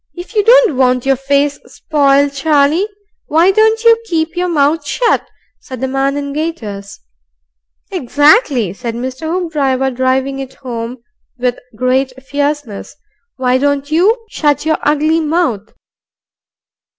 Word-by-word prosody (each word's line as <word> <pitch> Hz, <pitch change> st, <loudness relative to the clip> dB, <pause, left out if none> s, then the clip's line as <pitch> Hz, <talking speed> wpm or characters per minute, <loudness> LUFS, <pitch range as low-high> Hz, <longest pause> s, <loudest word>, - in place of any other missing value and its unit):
"If 355 Hz, +5 st, -9 dB
you 420 Hz, -2 st, +2 dB
don't 475 Hz, -, +5 dB
want 250 Hz, -1 st, +2 dB
your 270 Hz, 0 st, +3 dB
face 280 Hz, +2 st, 0 dB
sp'iled, 280 Hz, -2 st, +1 dB
Charlie, 295 Hz, +5 st, +2 dB, 0.4 s
why 335 Hz, +5 st, +4 dB
don't 440 Hz, +3 st, +2 dB
you 460 Hz, 0 st, +5 dB
keep 325 Hz, -4 st, -2 dB
your 360 Hz, +1 st, -1 dB
mouth 300 Hz, -1 st, +1 dB
shut?" 465 Hz, +11 st, 0 dB, 0.3 s
said 255 Hz, -2 st, -9 dB
the 265 Hz, -, -2 dB
person 270 Hz, +1 st, -1 dB
in 280 Hz, -1 st, -4 dB
gaiters. 225 Hz, -11 st, -5 dB, 0.9 s
"Exactly," 285 Hz, -, +2 dB
said 230 Hz, +2 st, -5 dB
Mr. 260 Hz, +6 st, -5 dB
Hoopdriver, 280 Hz, -7 st, 0 dB
driving 260 Hz, +2 st, -1 dB
it 265 Hz, -1 st, -7 dB
home 235 Hz, -1 st, -6 dB, 0.3 s
with 245 Hz, -1 st, -1 dB, 0.2 s
great 255 Hz, +2 st, 0 dB
fierceness. 285 Hz, -5 st, -3 dB, 0.4 s
"Why 255 Hz, 0 st, +1 dB
don't 285 Hz, +1 st, -1 dB
you 430 Hz, +9 st, +2 dB
shut 295 Hz, -7 st, 0 dB
your 315 Hz, 0 st, +1 dB
ugly 310 Hz, +2 st, +1 dB
mouth?" 305 Hz, -, -1 dB
285 Hz, 130 wpm, -15 LUFS, 260-320 Hz, 0.9 s, don't